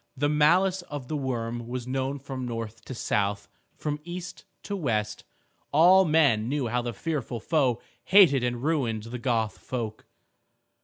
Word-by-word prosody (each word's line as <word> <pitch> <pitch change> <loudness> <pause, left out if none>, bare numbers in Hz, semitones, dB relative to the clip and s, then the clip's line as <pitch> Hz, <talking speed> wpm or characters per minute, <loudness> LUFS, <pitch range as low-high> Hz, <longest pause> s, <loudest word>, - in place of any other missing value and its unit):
The 145 +2 +1
malice 180 +6 +3
of 145 -4 -6
the 155 - -2
worm 120 -4 -3
was 125 0 -4
known 135 +2 -2
from 135 -1 -6
north 115 -1 -6
to 130 - -7
south, 100 -2 -1 0.3
from 150 -1 -3
east 175 +1 -7 0.2
to 205 - -4
west. 110 - -2 0.5
All 180 +6 +6
men 140 -9 +3
knew 140 -4 -1
how 120 +2 0
the 120 0 -3
fearful 125 0 -3
foe 130 -3 +1 0.3
hated 170 -10 +6
and 120 0 -2
ruined 130 -9 0
the 120 +2 -6
Goth 115 -4 -1
folk. 115 -4 -5
130 Hz, 155 wpm, -27 LUFS, 115-150 Hz, 0.5 s, All